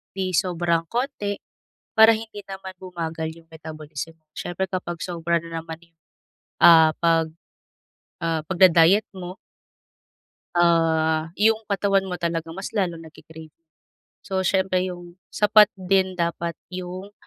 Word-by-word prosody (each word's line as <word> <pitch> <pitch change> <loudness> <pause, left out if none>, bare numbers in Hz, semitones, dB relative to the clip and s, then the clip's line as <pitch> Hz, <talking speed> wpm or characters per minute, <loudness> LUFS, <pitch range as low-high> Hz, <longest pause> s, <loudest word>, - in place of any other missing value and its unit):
'Di 190 -1 -2
sobrang 170 -1 0
konti, 235 -5 -2 0.6
para 220 +1 +8
hindi 220 -2 -9
naman 190 -1 -8
bumagal 165 -3 -5
yung 165 -1 -18
metabolism. 155 0 -8 0.2
Siyempre 175 +2 -3
kapag 175 -2 -4
sobra 170 -1 -1
na 165 -1 -6
naman 160 0 -8
yung, - - -51 0.7
ah, 160 -2 +8
pag 165 -1 +2 0.9
ah, 165 -1 -1
pagda-diet 185 +3 +5
mo 180 0 -7 1.2
ah, 165 -1 +2
yung 220 +1 +3
katawan 195 -1 +1
mo 180 - -3
talaga 170 -2 -3
mas 195 +1 -6
lalong 175 -6 -2
nagki-crave. 160 0 -13 0.7
So 190 -1 -1
siyempre 190 0 +1
yung 175 0 -11
sapat 210 0 +5
din 190 0 +1
dapat 170 -1 -2 0.2
yung, 185 +2 -7
175 Hz, 120 wpm, -23 LUFS, 165-190 Hz, 1.2 s, para